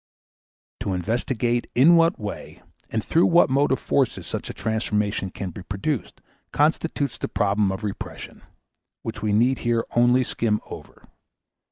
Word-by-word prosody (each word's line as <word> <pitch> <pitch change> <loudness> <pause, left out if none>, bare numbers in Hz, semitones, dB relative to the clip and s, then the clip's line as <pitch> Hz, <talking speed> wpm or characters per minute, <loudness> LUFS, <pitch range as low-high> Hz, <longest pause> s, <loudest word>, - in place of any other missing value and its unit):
To 100 -2 -2
investigate 120 +5 -1
in 150 +8 +7
what 165 0 +4
way 105 -1 -7 0.3
and 110 -1 -2
through 165 - +3
what 170 -5 +4
motive 135 0 +2
forces 135 -4 0
such - - -5
a - - -5
transformation 105 -3 -1
can 95 0 -6
be 90 - -9
produced 100 +9 -4 0.3
constitutes 150 -2 0
the - - -2
problem 100 -1 +1
of 95 +3 -5
repression, 100 -2 -6 0.6
which 110 -1 -5
we 105 0 0
need 120 +5 +3
here 120 -1 0
only 120 +2 +4
skim 110 -3 -1
over. - - -12
115 Hz, 145 wpm, -24 LUFS, 105-130 Hz, 0.6 s, in